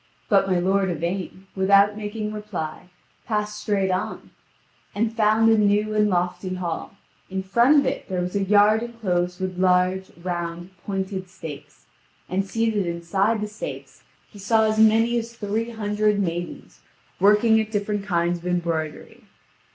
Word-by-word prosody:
But 195 -3 +4
my 185 -2 +2
lord 190 +2 +1
Yvain, 180 +3 -4
without 200 +2 +4
making 210 0 -4
reply, 185 -6 -6 0.4
passed 210 -1 -2
straight 195 -3 0
on, 185 - -3 0.6
and 220 +2 0
found 225 0 +4
a 225 - +4
new 210 +1 +2
and 210 0 +3
lofty 180 0 -1
hall; 180 +1 -4 0.3
in 190 0 -3
front 235 +10 +4
of - - -3
it 265 -4 -3
there 185 -1 -1
was 180 +2 -3
a 200 - +1
yard 210 +2 +4
enclosed 180 -7 -2
with 185 -1 -4
large, 185 +1 +2
round, 175 0 -4 0.2
pointed 190 -1 -3
stakes, 150 -4 -10 0.4
and 190 +2 0
seated 215 -1 0
inside 190 +6 0
the 210 - -2
stakes 210 +1 -8 0.3
he 205 - -15
saw 220 +3 +3
as 215 0 +1
many 225 +2 +4
as 230 0 -8
three 220 +2 -2
hundred 210 -2 0
maidens, 175 -2 -4 0.4
working 210 +3 +5
at 215 - -5
different 205 -1 -2
kinds 175 -2 0
of 175 - -8
embroidery. 170 -3 -3
200 Hz, 150 wpm, -23 LUFS, 180-215 Hz, 0.6 s, working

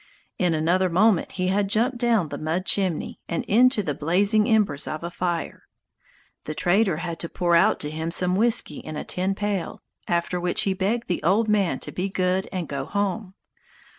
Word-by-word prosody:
In 175 -3 +2
another 175 +4 +1
moment 190 +2 +2
he 185 -1 -1
had 200 +1 +1
jumped 235 +4 +1
down 230 -9 +2
the - - -6
mud 165 +4 -2
chimney, 185 -6 0
and 170 - -2
into 240 0 +3
the 150 - -2
blazing 200 +9 +2
embers 205 -10 +1
of 155 +1 -5
a 170 - -4
fire. 175 -2 -3 0.8
The 155 - -5
trader 190 0 +2
had 170 0 -5
to 170 - -3
pour 175 -1 +1
out 170 - +4
to 150 - -3
him 160 +1 -3
some 180 +1 +1
whisky 220 -7 +1
in 155 - -8
a - - -4
tin 190 +2 -1
pail, 205 -3 -3 0.2
after 170 +1 -1
which 175 0 0
he 195 - +1
begged 205 +5 -1
the 175 - -2
old 200 +7 +2
man 205 -4 +1
to - - -6
"be 185 +2 -3
good 185 0 -1
and 180 -4 -4
go 140 -1 -4
home." 200 0 -3
185 Hz, 195 wpm, -24 LUFS, 170-205 Hz, 0.8 s, out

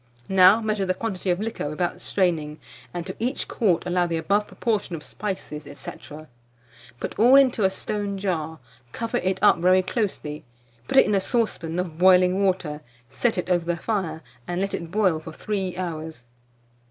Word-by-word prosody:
Now 190 +3 +6
measure 215 -3 -1
the 185 - +1
quantity 195 -3 -3
of 175 0 +1
liquor 215 -8 -3
without 175 +3 -2
straining, 165 -7 0 0.3
and 175 -1 -5
to 185 - -6
each 250 +4 -2
quart 185 -8 +1
allow 180 0 +1
the 165 -1 -1
above 200 +5 +1
proportion 215 -7 -2
of 155 - -8
spices, 185 -7 -6
&c. 135 - -6 1.1
Put - - -5
all 245 +5 +7
into 255 -6 +5
a - - +5
stone 200 +1 -4
jar, 160 -5 -2 0.4
cover 230 +1 -2
it 190 -4 0
up 205 - +6
very 185 +2 +4
closely, 185 -8 -3 0.4
put - - 0
it - - +8
in 210 - 0
a 195 - +3
saucepan 190 -7 -1
of 175 -3 -3
boiling 185 +1 +5
water, 175 -6 0 0.3
set 225 - 0
it 180 - -2
over 175 -2 +2
the 170 0 -1
fire, 170 -6 -2 0.2
and 175 0 -2
let 195 +1 -1
it 170 - -4
boil 185 -4 +2
for 160 +1 -9
3 190 -1 -3
hours. 160 -6 -5
185 Hz, 175 wpm, -24 LUFS, 170-205 Hz, 1.1 s, it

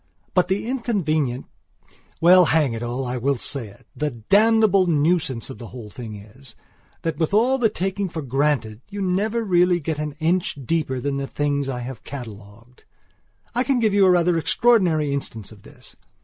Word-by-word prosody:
But 180 - +3
the 190 +3 -1
inconvenientwell, 155 - 0
hang 150 -7 +2
it 115 - -5
all, 120 +2 -3
I 125 +1 -3
will 135 +2 0
say 115 -4 -6 0.2
itthe 140 -7 -4
damnable 215 -2 +4
nuisance 150 -6 +1
of - - -10
the 120 - -8
whole 115 -4 -10
thing 115 -2 -8
is, 110 +4 -14 0.5
that 165 -3 -2
with 165 +4 0
all 255 +5 +3
the 225 -3 +3
taking 195 0 -2
for 160 -2 -5
granted, 135 -4 -1
you 205 0 -7
never 205 +5 0
really 180 -3 +3
get 155 -1 -3
an 150 -1 -3
inch 165 +2 0
deeper 145 -3 -1
than 140 +2 -2
the 140 0 -3
things 145 -1 -1
I 125 -2 -4
have 125 -1 -8
catalogued. 115 -2 -11 0.7
I 245 +2 +1
can 270 -1 +1
give 220 -3 +2
you 200 -1 +5
a - - +5
rather 175 -1 +3
extraordinary 170 -8 +2
instance 115 -7 -5
of 105 -2 -15
this. - - -15
150 Hz, 175 wpm, -22 LUFS, 125-185 Hz, 0.7 s, you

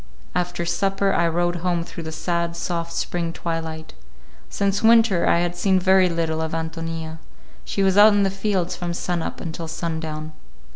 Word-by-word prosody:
After 175 0 -1
supper 195 +2 +1
I 170 - +2
rode 175 +1 0
home 175 -1 0
through 170 - -8
the 160 - -4
sad, 170 +1 -2
soft 170 -1 -3
spring 170 0 -2
twilight. 160 -1 -5 0.6
Since 200 0 0
winter 225 -5 +5
I 170 - +4
had 175 0 -1
seen 190 +1 +2
very 190 0 +4
little 165 -1 -1
of 160 0 -3
Ántonia. 160 0 -4 0.5
She 195 - -1
was 190 +1 +4
out 210 +1 +8
in 205 0 +3
the 195 - +1
fields 195 -3 -1
from 175 -1 -4
sun 175 -1 -2
up - - -5
until 165 0 -5
sun 165 0 -3
down. 155 -1 -5
170 Hz, 180 wpm, -23 LUFS, 165-190 Hz, 0.6 s, out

